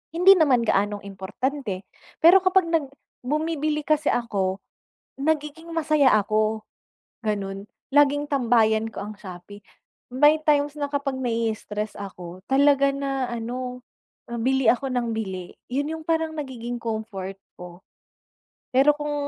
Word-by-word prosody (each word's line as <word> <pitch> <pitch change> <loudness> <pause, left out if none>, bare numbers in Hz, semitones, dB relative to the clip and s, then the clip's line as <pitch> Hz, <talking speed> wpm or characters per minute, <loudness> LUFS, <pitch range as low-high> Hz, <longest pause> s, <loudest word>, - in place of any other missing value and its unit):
Hindi 365 +3 +8
naman 275 -9 +3
gaanong 205 0 +1
importante, 200 +2 -4 0.4
pero 350 +4 +9
kapag 370 -1 +3
nag 320 -3 +2 0.4
bumibili 305 +2 -1
kasi 305 -1 +3
ako, 195 -4 -2 0.6
nagiging 310 +2 -2
masaya 305 -4 +3
ako, 215 +1 0 0.6
gano'n. 195 -2 -3 0.3
Laging 290 0 +4
tambayan 225 -5 +2
ko - - -10
ang 215 - -7
Shopee. 190 +2 -10 0.5
May 295 +5 +5
times 290 -1 +2
na 285 -1 -2
kapag 280 -1 -2
nai-stress 225 -3 -2
ako, 185 -2 -9
talaga 280 0 +4
na 275 -2 -2
ano, 250 +2 -5 0.6
bili 265 +1 +1
ako 260 +2 0
ng 245 -2 -1
bili. 190 -5 -5 0.2
Yun 285 +4 -1
yung 320 - -12
parang 320 -1 0
nagiging 245 -5 -5
comfort 215 -4 -5 0.2
ko. 180 0 -11 0.9
Pero 270 +3 +5
kung 295 0 -3
255 Hz, 125 wpm, -24 LUFS, 215-295 Hz, 0.9 s, pero